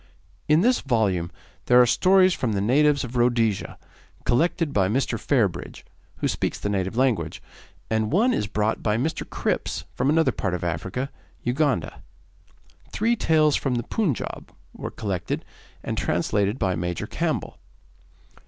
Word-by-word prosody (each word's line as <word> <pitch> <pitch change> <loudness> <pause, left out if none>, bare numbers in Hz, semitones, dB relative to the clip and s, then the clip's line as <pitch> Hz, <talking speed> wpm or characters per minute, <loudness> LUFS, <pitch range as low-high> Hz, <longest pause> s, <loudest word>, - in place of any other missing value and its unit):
In 155 +2 +5
this 250 +4 +3
volume 100 -9 0 0.4
there 125 0 +6
are 125 - +7
stories 185 +7 +4
from 115 -4 -1
the 100 - 0
natives 140 +7 +3
of 125 0 -7
Rhodesia, 120 -4 +1 0.5
collected 165 +3 +1
by 95 -2 +3
Mr. 120 -1 0
Fairbridge, 100 - -1 0.3
who - - -1
speaks - - -2
the 100 - -2
native 95 +2 -2
language, 130 -4 +1 0.5
and 110 -1 0
one 230 - +3
is 105 - -1
brought 105 +1 -1
by 105 0 +1
Mr. 155 +7 -2
Cripps - - -2
from 130 +3 0
another 160 +2 +3
part 95 -3 -2
of 90 - -5
Africa, 95 - -3 0.3
Uganda. 125 - 0 0.9
Three 230 +3 +1
tales 155 -7 +3
from 130 -3 0
the 120 - -1
Punjaub 170 - -2 0.2
were - - -6
collected 95 -5 -3 0.4
and - - -3
translated 105 +2 0
by 95 -6 0
Major 85 0 -3
Campbell. - - -3
120 Hz, 145 wpm, -24 LUFS, 100-150 Hz, 0.9 s, are